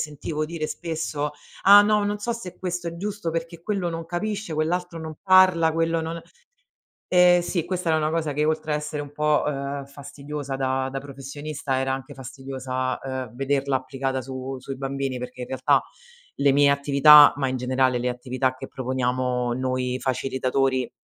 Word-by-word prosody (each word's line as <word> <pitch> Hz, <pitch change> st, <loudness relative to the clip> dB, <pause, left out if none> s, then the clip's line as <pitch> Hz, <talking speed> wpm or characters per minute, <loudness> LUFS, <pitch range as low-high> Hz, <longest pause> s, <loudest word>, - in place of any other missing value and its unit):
sentivo 150 Hz, +1 st, -3 dB
dire 155 Hz, -1 st, -4 dB
spesso: 155 Hz, -3 st, -3 dB, 0.3 s
"Ah 205 Hz, +1 st, +9 dB
no, 210 Hz, 0 st, +2 dB
non 205 Hz, 0 st, -1 dB
so 235 Hz, +3 st, -2 dB
se 230 Hz, -6 st, -8 dB
questo 180 Hz, -2 st, -3 dB
è 170 Hz, -, -7 dB
giusto 205 Hz, -2 st, -3 dB
perché 165 Hz, 0 st, -5 dB
quello 195 Hz, -3 st, -1 dB
non 165 Hz, 0 st, -4 dB
capisce, 200 Hz, +1 st, -3 dB
quell'altro 170 Hz, +2 st, -1 dB
non 160 Hz, -1 st, -6 dB
parla, 185 Hz, -4 st, +5 dB
quello 165 Hz, 0 st, +1 dB
non". 165 Hz, +1 st, -4 dB, 0.9 s
Ehm, 180 Hz, -1 st, +5 dB
sì, 175 Hz, -2 st, -2 dB
questa 180 Hz, -1 st, -2 dB
era 160 Hz, -, +3 dB
una 155 Hz, 0 st, 0 dB
cosa 160 Hz, -2 st, -1 dB
che, 150 Hz, +2 st, 0 dB
oltre 155 Hz, 0 st, -1 dB
a -, -, +2 dB
essere 150 Hz, 0 st, -4 dB
un 145 Hz, -, -10 dB
po', 150 Hz, 0 st, +1 dB
uhm, 140 Hz, -1 st, -3 dB
fastidiosa 140 Hz, 0 st, -7 dB
da 130 Hz, 0 st, -1 dB
da 135 Hz, -, -3 dB
professionista, 140 Hz, 0 st, -5 dB
era 135 Hz, 0 st, 0 dB
anche 135 Hz, -1 st, -5 dB
fastidiosa, 130 Hz, 0 st, -4 dB
uhm, 130 Hz, -3 st, -5 dB
vederla 135 Hz, 0 st, 0 dB
applicata 130 Hz, 0 st, -3 dB
su 130 Hz, +1 st, -6 dB
sui 135 Hz, +1 st, -7 dB
bambini, 135 Hz, -1 st, -3 dB
perché, 125 Hz, 0 st, -7 dB
in -, -, -5 dB
realtà, 130 Hz, -, +2 dB, 0.6 s
le 140 Hz, 0 st, +3 dB
mie 140 Hz, 0 st, +5 dB
attività, 140 Hz, +1 st, +7 dB
ma 140 Hz, -2 st, 0 dB
in 130 Hz, -, -2 dB
generale 130 Hz, 0 st, +1 dB
le 125 Hz, +1 st, -1 dB
attività 130 Hz, +1 st, -1 dB
che -, -, -7 dB
proponiamo 125 Hz, -1 st, -1 dB
noi 130 Hz, 0 st, -1 dB
facilitatori, 130 Hz, 0 st, 0 dB
140 Hz, 175 wpm, -24 LUFS, 130-165 Hz, 0.9 s, Ah